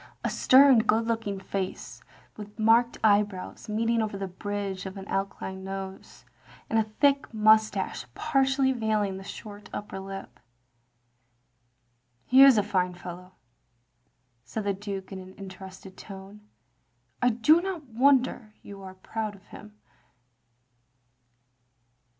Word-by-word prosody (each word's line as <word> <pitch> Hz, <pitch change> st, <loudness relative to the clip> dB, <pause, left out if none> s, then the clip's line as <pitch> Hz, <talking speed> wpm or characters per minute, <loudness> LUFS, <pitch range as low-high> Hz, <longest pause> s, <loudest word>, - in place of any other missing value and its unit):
A -, -, -1 dB
stem 265 Hz, -1 st, +6 dB
good 220 Hz, +1 st, +2 dB
looking 225 Hz, -4 st, -2 dB
face; 190 Hz, -1 st, -5 dB, 0.3 s
with 210 Hz, 0 st, -10 dB
marked 230 Hz, +2 st, +3 dB
eye 205 Hz, -1 st, +6 dB
brows 205 Hz, +1 st, -8 dB
meeting 225 Hz, +2 st, +1 dB
over 210 Hz, -2 st, -3 dB
the 195 Hz, 0 st, -4 dB
bridge 195 Hz, 0 st, -5 dB
of 190 Hz, +1 st, -8 dB
an 195 Hz, 0 st, -8 dB
aquiline 195 Hz, -1 st, -4 dB
nose, 195 Hz, 0 st, -8 dB, 0.5 s
and 225 Hz, -, +3 dB
a 215 Hz, -1 st, -1 dB
thick 280 Hz, -1 st, +3 dB
moustache 215 Hz, -, +2 dB
partially 270 Hz, -2 st, +2 dB
veiling 215 Hz, -5 st, -1 dB
the 190 Hz, -, -9 dB
short 205 Hz, +1 st, -10 dB
upper 205 Hz, -2 st, -6 dB
lip. 190 Hz, -11 st, -9 dB, 0.9 s
" 120 Hz, 0 st, -45 dB
He 260 Hz, +1 st, +8 dB
is 270 Hz, -4 st, +8 dB
a 210 Hz, -, +3 dB
fine 185 Hz, -3 st, -1 dB
fellow, 180 Hz, +1 st, -10 dB, 0.6 s
" 120 Hz, 0 st, -45 dB
said 215 Hz, -, -5 dB
the 200 Hz, 0 st, 0 dB
Duke 195 Hz, -1 st, -6 dB
in 190 Hz, -1 st, -9 dB
interested 190 Hz, 0 st, -11 dB
tones. 195 Hz, +1 st, -11 dB, 0.5 s
" 120 Hz, 0 st, -43 dB
I 245 Hz, -, +4 dB
do 245 Hz, +9 st, +4 dB
not 360 Hz, -5 st, -5 dB
wonder 250 Hz, -3 st, +2 dB
you 200 Hz, -1 st, -10 dB
are 190 Hz, -1 st, -10 dB
proud 215 Hz, +2 st, -5 dB
of 200 Hz, 0 st, -20 dB
him. 210 Hz, 0 st, -13 dB
205 Hz, 135 wpm, -27 LUFS, 190-225 Hz, 0.9 s, He